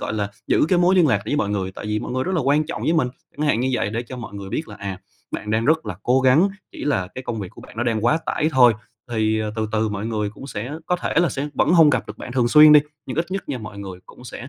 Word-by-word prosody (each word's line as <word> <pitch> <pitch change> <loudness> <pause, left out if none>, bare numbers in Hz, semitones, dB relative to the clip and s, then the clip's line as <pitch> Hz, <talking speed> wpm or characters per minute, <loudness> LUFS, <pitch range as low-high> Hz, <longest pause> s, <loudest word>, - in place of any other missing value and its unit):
gọi - - -3
là, 105 -2 -2 0.2
giữ - - +3
cái 180 - +3
mối 180 +2 +4
liên 180 -4 +5
lạc 105 -8 +2
với 145 - -1
mọi 100 - 0
người, 95 -2 -2
tại 105 - -8
vì 105 0 -1
mọi - - -5
người 130 0 -1
rất 190 - -2
là 170 - +1
quan 145 +3 +2
trọng 165 - -5
với 160 - +1
mình" 155 -7 +2 0.3
chẳng 150 - -1
hạn 120 -5 +2
như 130 - 0
vậy 115 - 0
để 115 +2 -2
cho 130 - -7
mọi 115 -4 -8
người 100 -1 -7
biết 155 - -3
là, 105 - -9
à, 95 -2 -6 0.3
bạn 105 - -5
đang 110 +1 +1
rất 155 -3 +2
là 90 - -4
cố 130 +2 +3
gắng, 130 +9 +4 0.2
chỉ - - -7
là 115 -11 0
cái 130 - -6
công 115 -2 -4
việc 95 - -5
của - - -14
bạn - - -14
nó 115 - -1
đang 115 -2 -1
quá 155 +7 +3
tải 155 - 0
thôi. 125 -3 +6 0.4
Thì, 110 -1 +1
ờ, 105 -1 -3
từ 110 -1 -1
từ 110 0 +1
mọi 105 +1 -4
người 105 -2 -2
cũng 105 +6 -11
sẽ 120 -1 -5 0.2
có 180 - +1
thể - - -3
là 175 - +3
sẽ 140 +2 -3
vẫn - - +2
hông 160 -4 +7
gặp 130 -5 0
được 105 - -9
bạn 125 - -7
thường 120 -2 +2
xuyên 150 +1 +8
đi, 150 - +9 0.3
nhưng 130 - -5
ít 165 +2 0
nhất 195 -3 -4
nha 135 - -3
mọi 105 -2 -9
người 95 -2 -8
cũng 125 - -15
sẽ 125 +2 -8
120 Hz, 320 wpm, -22 LUFS, 105-150 Hz, 0.4 s, đi